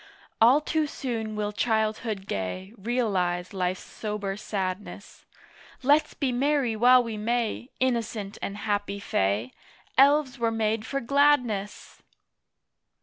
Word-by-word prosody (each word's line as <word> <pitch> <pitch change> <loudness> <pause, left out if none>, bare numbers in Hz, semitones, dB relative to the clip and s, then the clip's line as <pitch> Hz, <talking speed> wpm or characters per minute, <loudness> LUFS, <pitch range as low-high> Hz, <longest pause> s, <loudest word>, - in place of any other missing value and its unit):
All 250 +6 +6
too 310 0 0
soon 225 -6 -4
will 210 -1 -2
Childhood 220 -2 -1
gay 185 - -4
Realise 190 -6 -1
Life's 185 -1 -2
sober 210 -2 -4
sadness. 195 -2 -5 0.6
Let's 290 +4 +3
be 275 -3 0
merry 265 -2 +1
while 250 +3 +6
we 225 -2 -5
may, 235 +2 -1
Innocent 230 -5 -1
and 200 - -4
happy 205 -1 -2
Fay! 105 - -1 0.5
Elves 280 -1 +4
were 230 -1 +2
made 225 -1 -1
for 275 0 -2
gladness! 250 -6 +1
220 Hz, 115 wpm, -26 LUFS, 200-250 Hz, 0.6 s, All